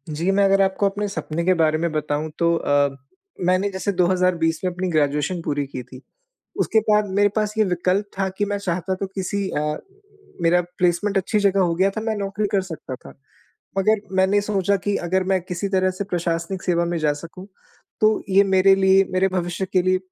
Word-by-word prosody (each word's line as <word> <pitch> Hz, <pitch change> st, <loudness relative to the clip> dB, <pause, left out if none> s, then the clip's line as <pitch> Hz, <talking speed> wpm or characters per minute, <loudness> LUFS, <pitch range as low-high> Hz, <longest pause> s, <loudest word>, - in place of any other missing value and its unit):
जी, 170 Hz, +5 st, -1 dB
मैं 200 Hz, +1 st, +3 dB
अगर 195 Hz, 0 st, +4 dB
आपको 195 Hz, +1 st, +1 dB
अपने 205 Hz, +1 st, -3 dB
सपने 170 Hz, -4 st, -4 dB
के 185 Hz, -, +4 dB
बारे 155 Hz, -1 st, +3 dB
में 170 Hz, +1 st, -1 dB
बताऊँ, 150 Hz, 0 st, -2 dB
तो 170 Hz, 0 st, +3 dB
अ, 145 Hz, -3 st, +1 dB, 0.5 s
मैंने 185 Hz, +3 st, +2 dB
जैसे 190 Hz, +1 st, -2 dB
2020 180 Hz, -3 st, +1 dB
में 185 Hz, -, 0 dB
अपनी 180 Hz, +1 st, -3 dB
ग्रेजुएशन 150 Hz, +2 st, 0 dB
पूरी 145 Hz, -1 st, -1 dB
की 130 Hz, -2 st, -6 dB
थी। 130 Hz, +1 st, -13 dB, 0.6 s
उसके 220 Hz, -, +3 dB
बाद 210 Hz, -1 st, +4 dB
मेरे 205 Hz, 0 st, +5 dB
पास 210 Hz, -1 st, 0 dB
ये 215 Hz, -, +5 dB
विकल्प 185 Hz, +2 st, 0 dB
था 195 Hz, -, +1 dB
कि 205 Hz, -, +2 dB
मैं 205 Hz, 0 st, -2 dB
चाहता, 185 Hz, -1 st, -2 dB
तो 195 Hz, +1 st, -4 dB
किसी 195 Hz, +1 st, -3 dB
अ, -, -, -2 dB, 0.8 s
मेरा 170 Hz, +1 st, +4 dB, 0.2 s
प्लेसमेंट 180 Hz, +3 st, +1 dB
अच्छी 205 Hz, +3 st, 0 dB
जगह 200 Hz, -1 st, +2 dB
हो 175 Hz, -2 st, +2 dB
गया 190 Hz, +3 st, +2 dB
था, 220 Hz, -, -5 dB
मैं 220 Hz, 0 st, -2 dB
नौकरी 200 Hz, +1 st, -2 dB
कर 200 Hz, -, +3 dB
सकता 160 Hz, -7 st, -7 dB
था। 125 Hz, -, -12 dB, 0.7 s
मगर 215 Hz, +2 st, +3 dB, 0.2 s
मैंने 190 Hz, +2 st, +3 dB
सोचा 200 Hz, -1 st, 0 dB
कि 205 Hz, -1 st, +1 dB
अगर 185 Hz, +2 st, +1 dB
मैं 190 Hz, -, +2 dB
किसी 180 Hz, +2 st, -4 dB
तरह 185 Hz, -1 st, +2 dB
से 200 Hz, -, -2 dB
प्रशासनिक 175 Hz, 0 st, -2 dB
सेवा 170 Hz, -1 st, +1 dB
में 170 Hz, 0 st, -2 dB
जा 150 Hz, -2 st, +1 dB
सकूँ, 180 Hz, +3 st, -10 dB, 0.5 s
तो 215 Hz, 0 st, +3 dB
ये 195 Hz, +1 st, +5 dB
मेरे 195 Hz, 0 st, +5 dB
लिए, 190 Hz, 0 st, +4 dB
मेरे 185 Hz, +1 st, +2 dB
भविष्य 180 Hz, 0 st, -2 dB
के 185 Hz, -, +3 dB
लिए 185 Hz, +1 st, +2 dB
185 Hz, 205 wpm, -22 LUFS, 170-200 Hz, 0.8 s, मेरे